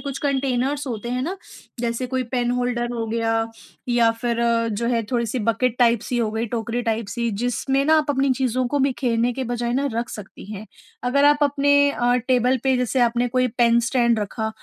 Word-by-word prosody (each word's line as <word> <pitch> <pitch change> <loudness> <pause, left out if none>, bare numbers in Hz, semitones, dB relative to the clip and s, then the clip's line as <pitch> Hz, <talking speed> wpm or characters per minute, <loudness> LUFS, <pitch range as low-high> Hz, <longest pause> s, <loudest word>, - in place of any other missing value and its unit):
कुछ 275 -1 -5
कंटेनर्स 275 0 -1
होते 235 -1 -4
हैं 250 +1 -1
ना 365 +7 -3 0.4
जैसे 235 +1 -2
कोई 260 0 -1
पेन 245 -1 +1
होल्डर 245 -1 -1
हो 230 -2 -3
गया 225 0 0 0.4
या 235 -1 +4
फ़िर 235 -1 -1 0.4
जो 235 +3 -2
है 235 -2 +1
थोड़ी-सी 235 0 0
बकेट 245 +1 +1
टाइप 235 -2 +4
सी 245 - 0
हो 225 -2 0
गई 225 +2 -2
टोकरी 235 +1 -3
टाइप 225 -2 -1
सी 235 +2 -2
जिसमें 245 +5 -1
ना 315 +1 +5
आप 295 -1 0
अपनी 275 0 +1
चीज़ों 255 -1 0
को 290 - 0
बिखेरने 245 -3 +1
के 260 +1 -4
बजाए 240 0 -2
ना 275 +3 0
रख 235 +2 -2
सकती 210 -3 -9
हैं। 210 +1 -8 0.4
अगर 280 +3 +2
आप 290 0 +5
अपने 285 0 +3
अ, 245 -2 +1
टेबल 255 0 +3
पे, 265 -1 +3
जैसे 250 +1 0
आपने 240 0 +2
कोई 255 +1 +1
पेन 235 0 +3
स्टैंड 235 -1 +2
रखा 220 +2 -3
245 Hz, 200 wpm, -22 LUFS, 230-265 Hz, 0.4 s, ना